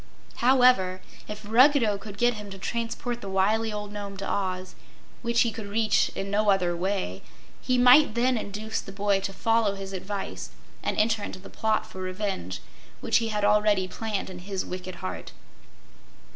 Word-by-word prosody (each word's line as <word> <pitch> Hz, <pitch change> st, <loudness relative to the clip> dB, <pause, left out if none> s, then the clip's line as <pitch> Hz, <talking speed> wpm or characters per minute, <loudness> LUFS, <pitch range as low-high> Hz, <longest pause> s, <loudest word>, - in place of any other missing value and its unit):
However, 245 Hz, -7 st, +4 dB, 0.3 s
if 210 Hz, 0 st, -7 dB
Ruggedo 235 Hz, -3 st, +5 dB
could 200 Hz, 0 st, -9 dB
get 240 Hz, +3 st, +3 dB
him 210 Hz, -2 st, -8 dB
to 195 Hz, -, -8 dB
transport 235 Hz, +3 st, -3 dB
the 195 Hz, -, -6 dB
wily 215 Hz, +4 st, +1 dB
old 210 Hz, 0 st, -5 dB
Nome 200 Hz, -1 st, -6 dB
to 195 Hz, -, -5 dB
Oz, 185 Hz, -2 st, -2 dB, 0.5 s
which 235 Hz, 0 st, +2 dB
he 235 Hz, -, +2 dB
could 220 Hz, -2 st, -7 dB
reach 215 Hz, +1 st, +2 dB
in 195 Hz, 0 st, -4 dB
no 210 Hz, +1 st, +2 dB
other 180 Hz, -3 st, +2 dB
way, 180 Hz, -, -2 dB, 0.4 s
he 255 Hz, -, +1 dB
might 250 Hz, 0 st, +6 dB
then 250 Hz, +2 st, +2 dB
induce 215 Hz, 0 st, -3 dB
the -, -, -10 dB
boy 200 Hz, 0 st, +1 dB
to 195 Hz, 0 st, -4 dB
follow 225 Hz, 0 st, +1 dB
his 195 Hz, 0 st, -7 dB
advice 190 Hz, -, -5 dB, 0.3 s
and -, -, -2 dB
enter 225 Hz, 0 st, +2 dB
into 195 Hz, -, -5 dB
the 185 Hz, -, -13 dB
plot 220 Hz, -1 st, 0 dB
for 190 Hz, -4 st, -9 dB
revenge, 185 Hz, -, -3 dB, 0.4 s
which 225 Hz, -, +2 dB
he 230 Hz, 0 st, 0 dB
had 210 Hz, -2 st, 0 dB
already 210 Hz, -2 st, +3 dB
planned 205 Hz, 0 st, -4 dB
in 180 Hz, -, -8 dB
his 190 Hz, +1 st, -4 dB
wicked 185 Hz, 0 st, -6 dB
heart. 90 Hz, -2 st, -6 dB
205 Hz, 175 wpm, -26 LUFS, 190-225 Hz, 0.5 s, might